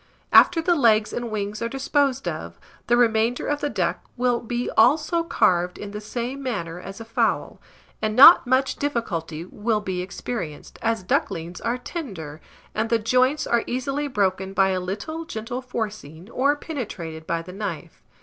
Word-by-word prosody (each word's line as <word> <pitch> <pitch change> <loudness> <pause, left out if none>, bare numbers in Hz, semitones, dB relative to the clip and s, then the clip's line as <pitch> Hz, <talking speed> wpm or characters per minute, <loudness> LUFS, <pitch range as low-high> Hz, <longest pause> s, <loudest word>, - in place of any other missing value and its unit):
After 330 -2 +6
the 350 - +3
legs 220 -8 +3
and 240 -1 -3
wings 210 0 -3
are 230 - -1
disposed 270 0 0
of, - - -5 0.3
the 240 - +4
remainder 230 0 +2
of 290 0 -1
the 290 - 0
duck 185 -8 -1
will 245 -1 +2
be 240 +1 -3
also 305 +8 +3
carved 180 - +1
in 205 -1 -7
the 210 +1 -6
same 245 +5 -4
manner 180 -10 -4
as 195 +3 -9
a 225 - -8
fowl; 230 - 0 0.4
and 215 0 -1
not 280 +2 +9
much 260 +1 +2
difficulty 170 - -3
will 215 +3 -1
be 190 -3 -3
experienced, 180 -4 -6
as 225 -3 0
ducklings 170 -1 -2
are 235 +2 -1
tender, 190 - -7 0.3
and 220 +1 -1
the 230 - +3
joints 255 +6 +2
are 235 -1 +1
easily 275 +4 -2
broken 195 -5 0
by 195 0 +3
a 185 -1 0
little 205 - -4
gentle 245 -3 -5
forcing, 215 - -6
or 280 +3 +2
penetrated 190 - -6
by 165 0 -1
the 180 +2 -10
knife. 195 -6 -6
225 Hz, 170 wpm, -24 LUFS, 190-255 Hz, 0.4 s, not